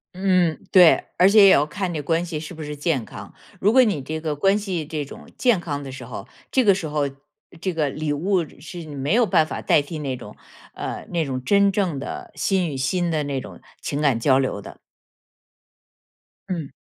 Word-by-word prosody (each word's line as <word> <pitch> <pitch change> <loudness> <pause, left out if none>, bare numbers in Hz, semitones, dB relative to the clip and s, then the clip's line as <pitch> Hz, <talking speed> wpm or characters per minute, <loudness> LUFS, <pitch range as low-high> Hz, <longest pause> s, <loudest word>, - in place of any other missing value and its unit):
嗯， 185 -4 +2
对。 180 -3 +7
而 180 - +6
且 205 0 +7
也 - - +8
要 145 -5 +5
看 185 +3 -3
这 155 - -3
关 165 +3 0
系 165 -3 -4
是 155 +3 -8
不 160 -2 -8
是 150 0 -5
健 145 -4 -1
康， - - -11 0.3
如 210 +3 +3
果 260 0 +7
你 205 - 0
这 155 +4 -5
个 155 -2 -2
关 195 +7 +3
系 190 -6 -3
这 155 -1 -4
种 - - -12
健 240 -7 +3
康 145 -4 -4
的 135 - -7
时 130 -2 -8
候， 115 - -8 0.2
这 260 - +3
个 200 -4 +5
时 180 -4 -4
候， 150 -2 -1 0.5
这 185 - -1
个 155 -3 0
礼 150 +1 -2
物 175 +3 0
是 170 +2 -9
没 145 +2 -2
有 240 0 +4
办 160 -6 +3
法 - - -5
代 - - +3
替 150 +3 -7
那 135 -3 -3
种， 105 -4 -11 0.4
呃， - - -5
那 170 -2 0
种 130 -2 -4
真 200 +6 +4
正 185 -6 0
的 135 - -6
心 185 -4 0
与 140 - -5
心 175 +7 0
的 155 -2 0
那 140 -2 -3
种 - - -11 0.2
情 145 +1 -3
感 135 -6 +2
交 130 +2 +4
流 130 -6 -1
的。 - - -11 1.7
嗯。 165 -7 -4
160 Hz, 230 characters per minute, -23 LUFS, 145-185 Hz, 1.7 s, 也